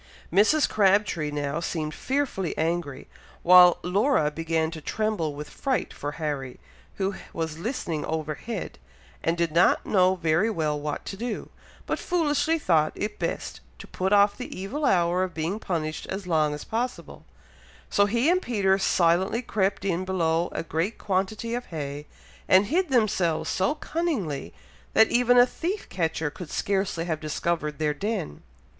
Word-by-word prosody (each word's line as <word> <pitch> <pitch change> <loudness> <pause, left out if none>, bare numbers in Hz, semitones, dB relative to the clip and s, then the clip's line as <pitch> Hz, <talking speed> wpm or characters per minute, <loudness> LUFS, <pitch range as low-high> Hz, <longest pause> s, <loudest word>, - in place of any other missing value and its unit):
Mrs. 220 - +4
Crabtree 195 -6 +2
now 145 +1 -2
seemed 160 -2 -3
fearfully 260 - -2
angry, 160 -4 -2 0.4
while 180 0 +8
Laura 180 - +2
began 165 0 -1
to 160 -2 -8
tremble 190 -5 -1
with 150 +1 -7
fright 270 -2 -2
for 145 +1 -5
Harry, 145 -5 -4 0.4
who 195 +1 -1 0.2
was 160 -1 -4
listening 170 - -3
overhead, 160 +7 -4 0.4
and 165 +1 0
did 170 -2 0
not 170 +3 +3
know 185 -2 +3
very 170 +4 +1
well 155 -7 -1
what 150 0 -4
to - - -5
do, 230 +2 -5 0.3
but - - -2
foolishly 325 -2 +1
thought 160 - +2
it 210 0 -4
best 170 - -3 0.2
to - - -10
put 190 +1 -2
off 205 0 +5
the 250 - -6
evil 270 +11 -3
hour 175 -2 +3
of 185 -1 -2
being 165 +6 -2
punished 160 -6 -3
as 190 0 -5
long 155 -4 +2
as 150 - -8
possible; 245 +3 -4 0.6
so 200 0 +3
he 235 +6 +1
and 365 +2 +3
Peter 200 - +1
silently 190 +6 +2
crept 195 -3 -1
in 185 -1 0
below 170 -2 0
a - - -3
great 165 +7 -2
quantity 205 +4 -2
of 245 +1 -3
hay, 145 -2 -6 0.4
and 190 +2 +6
hid 345 - 0
themselves 205 - +1
so 190 +10 +1
cunningly, 285 - -2 0.4
that 220 - +6
even 245 0 +4
a 245 - +8
thief 360 +10 -4
catcher 160 -3 -1
could 170 +1 -9
scarcely 190 -4 -1
have 160 -3 -2
discovered 155 -1 -2
their 150 -1 0
den. 195 - -4
185 Hz, 155 wpm, -26 LUFS, 160-215 Hz, 0.6 s, while